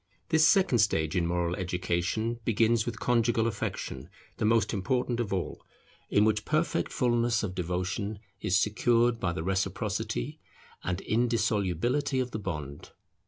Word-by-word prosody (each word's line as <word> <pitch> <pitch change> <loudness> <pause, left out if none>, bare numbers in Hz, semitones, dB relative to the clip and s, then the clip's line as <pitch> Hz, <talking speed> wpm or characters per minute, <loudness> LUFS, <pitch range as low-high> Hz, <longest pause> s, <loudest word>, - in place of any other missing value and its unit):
This 160 -1 +5
second 185 - +4
stage 80 -5 +2
in 85 -2 +1
moral 85 0 0
education 90 +5 -1
begins 115 +1 +2
with 115 -1 -4
conjugal 115 -2 +2
affection, 115 - -4 0.3
the - - 0
most 110 -1 +3
important 120 +4 0
of 115 -4 -2
all, 95 -3 -3 0.5
in 105 - +4
which 110 -1 +1
perfect 155 +3 0
fullness 120 -3 +1
of 95 -3 -3
devotion 95 +4 -2 0.2
is 90 +1 +2
secured 115 +3 +2
by 90 - 0
the 80 -1 -4
reciprocity 95 -9 -2 0.4
and 90 +3 -2
indissolubility 115 - +1
of 125 -1 -2
the 110 - -4
bond. 75 -8 -6
110 Hz, 140 wpm, -29 LUFS, 90-120 Hz, 0.5 s, This